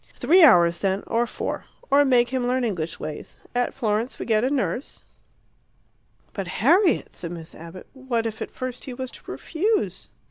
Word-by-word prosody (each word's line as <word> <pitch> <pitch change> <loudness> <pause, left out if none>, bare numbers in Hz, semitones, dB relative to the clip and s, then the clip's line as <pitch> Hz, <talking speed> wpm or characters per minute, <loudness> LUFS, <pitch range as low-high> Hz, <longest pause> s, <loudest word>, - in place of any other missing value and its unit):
"Three 365 +3 +4
hours, 170 - +6
then, 195 0 0
or 235 +1 0
four; - - -4 0.3
or 285 +1 +6
make 245 -3 +4
him 255 -1 -1
learn 255 +1 +1
English 170 -8 -3
ways. 155 -1 -7 0.2
At 245 0 0
Florence 225 -1 -1
we - - -5
get 220 -1 +2
a 255 - +2
nurse 275 -1 -2 0.7
" - - -40
"But, 195 -3 -4
Harriet," 330 - +2
said 170 - -6
Miss 165 -2 -8
Abbott, 170 +3 -10
"what 260 -4 -2
if 220 -1 -4
at - - -4
first 255 -1 -6
he 255 - -6
was 260 0 -5
to - - -10
refuse?" 410 +7 -1
240 Hz, 180 wpm, -24 LUFS, 190-265 Hz, 0.7 s, hours